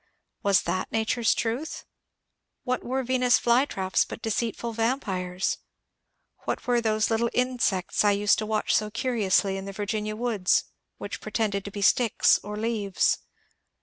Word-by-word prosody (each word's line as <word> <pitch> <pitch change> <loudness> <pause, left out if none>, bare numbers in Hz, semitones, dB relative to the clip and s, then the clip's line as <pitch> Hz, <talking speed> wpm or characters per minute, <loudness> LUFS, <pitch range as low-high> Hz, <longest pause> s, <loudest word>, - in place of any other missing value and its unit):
Was 200 -2 +3
that 185 - -2
nature's 225 +1 +1
truth? 240 +8 -3 0.8
What 255 -1 -1
were 260 +2 -1
Venus' 250 0 +3
flytraps 235 -6 +2
but - - -8
deceitful 230 +1 -2
vampires? 195 -6 -1 0.9
What - - -3
were 245 -1 +2
those 215 -1 +1
little 230 +1 +1
insects 245 -9 +1
I 205 - +5
used 205 +1 +3
to 215 - -3
watch 215 -1 0
so 215 0 +1
curiously 210 -5 +1
in 195 - -6
the 195 - -6
Virginia 210 +1 -3
woods, 215 -5 +1 0.3
which - - -6
pretended 205 -3 -1
to 200 - -6
be 200 0 -4
sticks 230 +2 +4
or 210 +1 -6
leaves 215 -3 0
220 Hz, 145 wpm, -26 LUFS, 200-240 Hz, 0.9 s, I